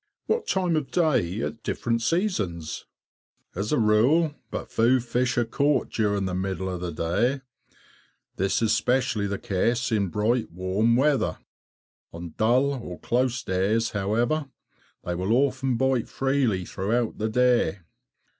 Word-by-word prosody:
What 465 - -1
time 180 -3 +1
of 150 -3 -1
day 115 - +1
at 115 - -4
different 115 0 -1
seasons_? 110 - -1 0.7
As 100 +4 -3
a - - +2
rule, 125 +9 +3 0.2
but - - -6
few 120 +3 +3
fish 125 +1 -1
are 120 - +3
caught 140 +4 +1
during 100 -3 0
the 95 - -3
middle 95 0 -2
of 90 -1 -5
the 90 -1 -3
day; 90 - 0 0.9
this 95 +3 0
is 110 - +2
especially 115 -2 +1
the 100 0 -2
case 115 +7 0
in 105 -3 +1
bright 110 +5 0
warm 95 +6 +1
weather. 140 +2 +2 0.8
On 85 -1 -8
dull, 120 -4 +1
"close" 125 +1 0
days, 105 +5 0
however, 115 +9 0 0.6
they 90 - -3
will 95 +5 0
often 130 -1 +1
bite 130 -2 +1
freely 135 -9 0
throughout 110 +6 -2
the 110 +1 0
day. 120 -4 +2
115 Hz, 140 wpm, -25 LUFS, 95-130 Hz, 0.9 s, rule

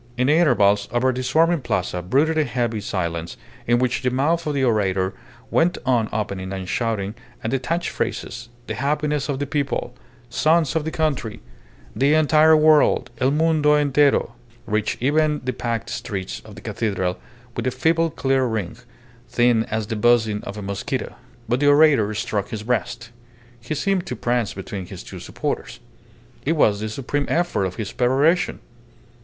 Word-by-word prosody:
In 125 - +2
the 145 - +4
intervals, 105 -12 +3
over 130 +2 +2
the 130 - -3
swarming 165 +5 +2
Plaza 90 -6 -2
brooded 140 - +2
a 155 - +3
heavy 120 -4 -2
silence, 85 -4 -3 0.3
in 120 0 +4
which 125 0 0
the 130 - +1
mouth 155 +6 0
of 150 - -1
the 135 - +1
orator 95 -5 +1 0.4
went 175 +2 +2
on 120 -4 +2
opening 100 -3 -3
and 95 -1 -5
shutting, 105 -1 -1 0.3
and 110 - -2
detached 150 +6 -1
phrases 120 0 -4 0.2
"The - - -4
happiness 150 +1 -1
of 140 - -1
the 145 - -2
people," 140 -1 -2 0.3
"Sons 160 -1 +2
of 160 -2 0
the - - -1
country," 150 -9 -2 0.6
"The 140 +3 +3
entire 155 0 +5
world, 150 -5 +4
el 130 0 +3
mundo 150 0 +3
entiero" 145 -3 +3 0.3
reached 105 +1 -1
even 150 +2 +2
the 130 0 -2
packed 115 -1 -3
steps 100 - -4
of - - -12
the - - -11
cathedral 95 -5 -2 0.4
with - - -2
a - - +4
feeble 165 +4 +1
clear 135 -3 +1
ring, 110 -6 -3 0.5
thin 120 -2 +3
as 110 0 -2
the 110 - -4
buzzing 110 -1 +2
of 100 - -6
a 105 - -6
mosquito. 100 0 -3 0.3
But 120 +3 +1
the 145 - +2
orator 145 -7 +5
struck 100 -1 -2
his 110 -1 -5
breast; 115 0 -2 0.5
he 125 +6 -4
seemed 190 +4 0
to 125 - -3
prance 120 -1 -1
between 95 -1 -6
his - - -9
two - - -9
supporters. - - -4 0.6
It 155 - +1
was 105 -10 +3
the 110 +1 -3
supreme 140 +5 -2
effort 175 - +1
of 90 - -4
his 110 -3 -4
peroration. 140 +8 +2
125 Hz, 170 wpm, -22 LUFS, 110-150 Hz, 0.6 s, entire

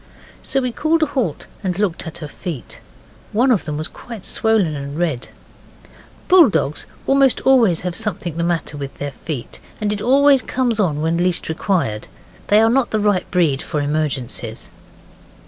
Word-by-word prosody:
So 270 - 0
we 250 -1 -1
called 315 +6 +1
a - - +5
halt 255 - -2 0.2
and 180 -2 -1
looked 195 -5 -1
at 160 - -7
her - - -6
feet. 145 - -7 0.5
One 250 +5 +3
of 220 - +2
them 150 -2 -3
was 155 +2 -3
quite 230 -6 -10
swollen 215 -8 +1
and 140 +1 -6
red. 155 -8 -1 1.0
Bulldogs 205 - +4 0.2
almost 270 -1 +3
always 235 -10 +4
have 180 -1 -3
something 205 -7 -3
the 170 - -1
matter 170 -3 -1
with 140 -1 -7
their 145 0 -4
feet, 135 -2 -6 0.2
and 210 -1 0
it 205 - -4
always 275 +2 +5
comes 245 -4 -1
on 155 -7 +1
when 165 +1 +1
least 175 -1 +1
required. 160 - -1 0.4
They 210 +2 +5
are 225 - +4
not 265 0 +2
the 215 - 0
right 205 -3 +1
breed 160 -7 +2
for 150 - -3
emergencies. 145 -4 -2
180 Hz, 170 wpm, -19 LUFS, 155-235 Hz, 1.0 s, a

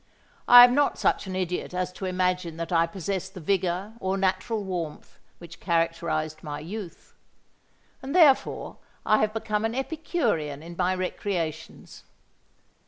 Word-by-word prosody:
I 245 0 +11
am 245 0 +6
not 285 +2 +2
such - - 0
an 185 - -5
idiot 180 -1 -3
as 180 0 -2
to 190 - -6
imagine 180 -2 -1
that 165 +1 -5
I 165 -1 +3
possess 190 +1 -4
the 190 -1 -10
vigour 185 +3 -1
or 190 -1 -1
natural 195 +3 -1
warmth 175 -5 -6 0.2
which 170 -1 -12
characterised 165 -2 -1
my 145 -1 -6
youth; 180 +1 -8 0.9
and 275 +4 -5
therefore 305 -7 +3 0.3
I 215 - +4
have 215 0 +1
become 215 -1 -2
an 225 +1 -1
Epicurean 250 - -2
in 170 +1 -9
my 185 +1 +1
recreations. 180 -3 -4
185 Hz, 145 wpm, -26 LUFS, 170-215 Hz, 0.9 s, I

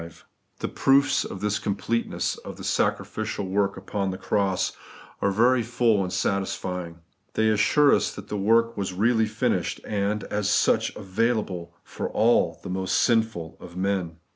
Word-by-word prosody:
The - - -1
proofs 135 +1 +3
of 95 - -7
the 105 0 0
completeness 110 +3 -1
of - - -9
the - - -9
sacrificial 100 - -1
work 100 +1 0
upon 95 +1 -3
the 95 - -4
cross 100 -2 0 0.5
are 100 - +2
very 120 +5 +3
full 115 -2 +2
and 90 - -2
satisfjdng. 90 -3 -2 0.4
They 110 0 +3
assure 110 +7 +4
us - - +2
that 100 0 -9
the 105 - -4
work 115 +3 +3
was 95 -2 -3
really 110 +3 +2
finished, 110 0 -1
and, 105 0 -1
as 105 -1 -2
such, - - +2
available 95 -4 -2
for - - -5 0.5
the - - -7
most 95 0 0
sinful 110 -9 +1
of 85 - -11
men. 95 -4 -1
100 Hz, 150 wpm, -25 LUFS, 95-110 Hz, 0.5 s, assure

